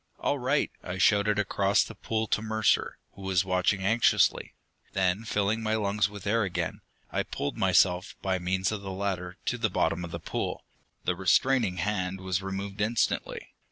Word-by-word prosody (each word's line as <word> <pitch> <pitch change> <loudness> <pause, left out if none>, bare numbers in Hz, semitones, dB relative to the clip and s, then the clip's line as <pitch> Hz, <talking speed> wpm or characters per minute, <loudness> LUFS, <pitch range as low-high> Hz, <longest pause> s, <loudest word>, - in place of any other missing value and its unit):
"All - - 0
right!" - - +1
I 90 +1 -5
shouted 105 +2 +3
across 100 -1 +2
the - - -9
pool 110 0 -2
to - - +1
Mercer, 110 -1 +1
who 100 - -14
was 95 -1 +1
watching 95 +1 +1
anxiously. 115 +5 +2 0.4
Then, 95 +3 +1
filling 105 +1 0
my 110 0 0
lungs 105 -1 +1
with 100 -1 -10
air 115 +3 +2
again, 95 -4 -2 0.3
I - - 0
pulled 70 - -4
myself, 95 -2 +2
by 95 -1 0
means 95 +2 0
of 105 -2 -4
the 100 - -6
ladder, 95 -2 -3
to 125 - -1
the 110 -1 +1
bottom 90 -1 0
of 85 - -5
the 85 - -5
pool. 80 - -4 0.4
The 90 - 0
restraining 100 +2 +2
hand 95 -2 -1
was 95 -1 -1
removed 95 +1 -4
instantly. 110 +2 -1
100 Hz, 175 wpm, -28 LUFS, 95-105 Hz, 0.4 s, shouted